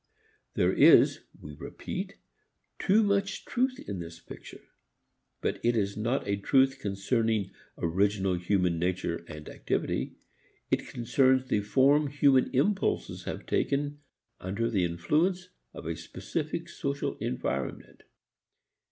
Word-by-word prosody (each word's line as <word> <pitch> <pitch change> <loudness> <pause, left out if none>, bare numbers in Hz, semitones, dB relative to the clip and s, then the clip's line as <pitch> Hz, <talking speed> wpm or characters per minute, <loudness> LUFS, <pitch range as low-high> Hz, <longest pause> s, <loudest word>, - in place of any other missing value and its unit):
There - - +3
is, - - +6 0.2
we 75 - -9
repeat, - - -6 0.6
too 215 +4 +4
much 200 -1 0
truth 255 +1 0
in 100 -3 -4
this 85 -1 -8
picture. - - -12 0.8
But - - -2
it 120 0 +2
is 100 -1 0
not 115 +2 -1
a 100 0 +1
truth 135 +5 +3
concerning 105 0 0 0.3
original 95 +3 +1
human 90 -1 +1
nature 85 -1 -1
and 75 -2 -9
activity. - - -2 0.6
It - - 0
concerns 130 +2 +2
the 105 - +2
form 140 +7 +4
human 140 -2 +3
impulses 190 +10 0
have - - -5
taken 145 +1 0 0.4
under 105 +6 -2
the 95 -5 +2
influence 160 - 0 0.2
of - - -10
a 80 0 -2
specific 85 0 -4
social 70 - -3
environment. 65 +1 -4
110 Hz, 120 wpm, -29 LUFS, 90-140 Hz, 0.8 s, is